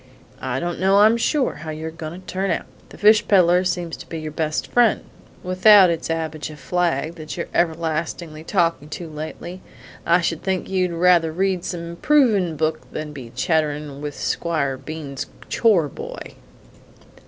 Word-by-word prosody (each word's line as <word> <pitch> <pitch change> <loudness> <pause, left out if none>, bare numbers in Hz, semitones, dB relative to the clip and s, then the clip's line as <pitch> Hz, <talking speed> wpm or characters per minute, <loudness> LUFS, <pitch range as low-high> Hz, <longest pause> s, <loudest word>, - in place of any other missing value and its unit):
I 130 0 -2
don't 175 +1 -3
know, 195 +2 +4
I'm 220 +2 +6
sure, 260 +3 0
how 160 - -6
you're 155 +1 -5
goin' 160 +2 -7
to - - -22
turn 190 +1 -2
out! 170 - -1 0.2
The - - -13
fish 210 0 +5
peddler 180 -2 +5
seems 175 -2 -2
to - - -12
be 165 - -5
your 155 -1 -5
best 155 0 -2
friend, 240 -3 +3 0.4
without 185 0 +6
it's 165 -1 -3
Abijah 160 -1 -3
Flagg 170 -3 -1
that 155 0 -7
you're 170 - -2
everlastingly 160 -1 -1
talkin' 165 -4 0
to 170 +2 -6
lately. 160 +4 -7 0.4
I 170 +1 +4
should 165 -1 -1
think 190 -1 -2
you'd 185 -1 0
rather 170 -1 +3
read 185 +1 0
some 175 -2 -4
improvin' 200 - +2
book 155 +1 -2
than 155 0 -5
to - - -10
be 130 -5 -9
chatterin' 150 -1 -1
with 145 -1 -5
Squire 155 -6 -1
Bean's 145 -1 -6 0.2
chore 200 -10 +3
boy!" - - -8
170 Hz, 165 wpm, -22 LUFS, 155-185 Hz, 0.4 s, I'm